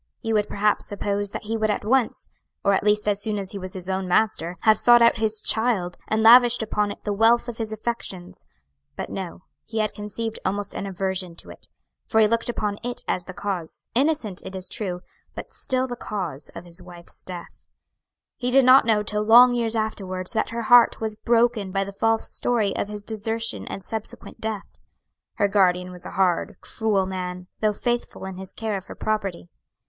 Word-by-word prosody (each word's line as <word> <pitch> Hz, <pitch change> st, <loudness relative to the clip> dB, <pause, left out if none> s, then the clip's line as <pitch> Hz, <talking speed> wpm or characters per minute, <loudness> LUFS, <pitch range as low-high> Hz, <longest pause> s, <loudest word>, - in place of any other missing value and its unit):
You 225 Hz, -1 st, -1 dB
would 210 Hz, -1 st, +2 dB
perhaps 210 Hz, +1 st, +1 dB
suppose 205 Hz, 0 st, -1 dB
that -, -, -6 dB
he 220 Hz, +2 st, -3 dB
would 220 Hz, -1 st, 0 dB
at 205 Hz, -, -1 dB
once 250 Hz, +1 st, +1 dB, 0.4 s
or 200 Hz, -, +3 dB
at 195 Hz, -, +1 dB
least 210 Hz, 0 st, +2 dB
as 205 Hz, -1 st, +1 dB
soon 210 Hz, 0 st, 0 dB
as 195 Hz, -2 st, -5 dB
he 200 Hz, -, -6 dB
was 185 Hz, -1 st, -7 dB
his 185 Hz, -1 st, -6 dB
own 190 Hz, 0 st, -2 dB
master 180 Hz, -3 st, +1 dB
have 220 Hz, -1 st, +4 dB
sought 240 Hz, 0 st, +7 dB
out 235 Hz, 0 st, +5 dB
his 220 Hz, -1 st, 0 dB
child, 220 Hz, -6 st, +1 dB
and 220 Hz, 0 st, +1 dB
lavished 240 Hz, 0 st, +7 dB
upon 210 Hz, -1 st, 0 dB
it -, -, -10 dB
the 205 Hz, -, -1 dB
wealth 230 Hz, +4 st, +4 dB
of 235 Hz, -2 st, -6 dB
his 220 Hz, -1 st, -4 dB
affections: 215 Hz, -5 st, -5 dB, 0.5 s
but -, -, -5 dB
no; 185 Hz, -1 st, -6 dB, 0.2 s
he 225 Hz, -, -6 dB
had 215 Hz, -1 st, 0 dB
conceived 215 Hz, +2 st, -5 dB
almost 200 Hz, +1 st, -2 dB
an 200 Hz, -, -4 dB
aversion 190 Hz, -2 st, -2 dB
to -, -, -10 dB
it; -, -, -14 dB, 0.4 s
for 220 Hz, -, +2 dB
he 220 Hz, -, +7 dB
looked 230 Hz, +2 st, 0 dB
upon 210 Hz, -3 st, -2 dB
it 245 Hz, 0 st, -4 dB
as 180 Hz, -, -1 dB
the 185 Hz, -, -8 dB
cause 195 Hz, -5 st, -4 dB
innocent, 255 Hz, -, +1 dB
it 190 Hz, -, -8 dB
is 185 Hz, -1 st, -3 dB
true 180 Hz, -3 st, -3 dB, 0.3 s
but -, -, -8 dB
still 255 Hz, 0 st, -1 dB
the 245 Hz, -2 st, -5 dB
cause 175 Hz, -, -5 dB
of 170 Hz, -, -8 dB
his 175 Hz, +1 st, -9 dB
wife's 175 Hz, -1 st, -12 dB
death. 175 Hz, -2 st, -9 dB, 0.7 s
He 250 Hz, -1 st, -2 dB
did 265 Hz, +1 st, +5 dB
not 255 Hz, 0 st, +7 dB
know 215 Hz, -2 st, +2 dB
till 210 Hz, 0 st, -2 dB
long 240 Hz, +3 st, +8 dB
years 230 Hz, -1 st, 0 dB
afterwards 190 Hz, -4 st, -3 dB
that 220 Hz, -, 0 dB
her 235 Hz, 0 st, -4 dB
heart 240 Hz, +1 st, +6 dB
was 220 Hz, -1 st, -2 dB
broken 230 Hz, -3 st, +1 dB
by 195 Hz, +1 st, 0 dB
the 195 Hz, -, -7 dB
false 225 Hz, +2 st, +1 dB
story 220 Hz, -5 st, 0 dB
of -, -, -2 dB
his 210 Hz, 0 st, -7 dB
desertion 225 Hz, +1 st, -3 dB
and 195 Hz, -, -6 dB
subsequent 220 Hz, 0 st, -5 dB
death. 205 Hz, -, -5 dB, 0.6 s
Her 205 Hz, -, +2 dB
guardian 180 Hz, -3 st, +2 dB
was 180 Hz, -1 st, -10 dB
a -, -, -8 dB
hard, 190 Hz, +2 st, +1 dB
cruel 210 Hz, -4 st, 0 dB
man, 180 Hz, -1 st, -5 dB
though 215 Hz, -1 st, +2 dB
faithful 240 Hz, -1 st, -3 dB
in 190 Hz, -1 st, -7 dB
his 190 Hz, 0 st, -8 dB
care 220 Hz, -2 st, -3 dB
of 190 Hz, -, -9 dB
her -, -, -10 dB
property. 200 Hz, -5 st, -2 dB
210 Hz, 205 wpm, -24 LUFS, 190-225 Hz, 0.7 s, long